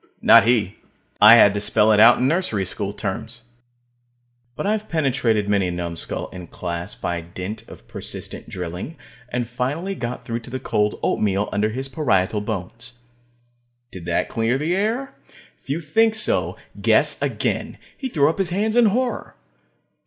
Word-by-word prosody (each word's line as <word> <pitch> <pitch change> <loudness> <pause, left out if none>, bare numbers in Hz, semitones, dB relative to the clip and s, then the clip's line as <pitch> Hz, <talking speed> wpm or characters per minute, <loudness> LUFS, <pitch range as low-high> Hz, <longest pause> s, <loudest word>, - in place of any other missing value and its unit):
Not - - +7
he. 110 -5 +1 0.4
I 105 +2 +10
had 105 -4 +7
to 100 - -1
spell 105 +1 +3
it 105 - +4
out 115 +3 +8
in 130 - +1
nursery 140 - 0
school 100 +2 -3
terms. 110 +4 -5 1.1
But - - -4
I've 215 +1 -1
penetrated 125 -9 +1
many 100 -2 +2
a - - -2
numbskull 85 -1 -4
in 90 -2 -9
class 85 +2 -5
by 85 -1 -3
dint 90 +5 -7
of - - -14
persistent - - -6
drilling, 90 - -6 0.3
and 120 -1 -2
finally 140 +11 -3
got 125 -8 -5
through 115 0 -3
to 115 - -10
the 130 +1 -4
cold 105 -3 0
oatmeal 100 0 0
under 105 +1 +1
his 130 +5 -4
parietal 110 - 0
bones. 110 +4 -6 1.0
Did 90 -3 -9
that 85 0 0
clear 115 +3 0
the 160 +5 0
air? 225 +7 -1 0.5
If - - -24
you 145 +4 0
think 220 +8 +2
so, 215 - -1 0.2
guess - - +2
again. - - -2 0.2
He 265 - -5
threw 145 - +3
up 160 +5 -1
his 190 -3 +1
hands 210 +5 0
in 240 -2 +6
horror. 245 +4 -1
115 Hz, 165 wpm, -22 LUFS, 100-160 Hz, 1.1 s, I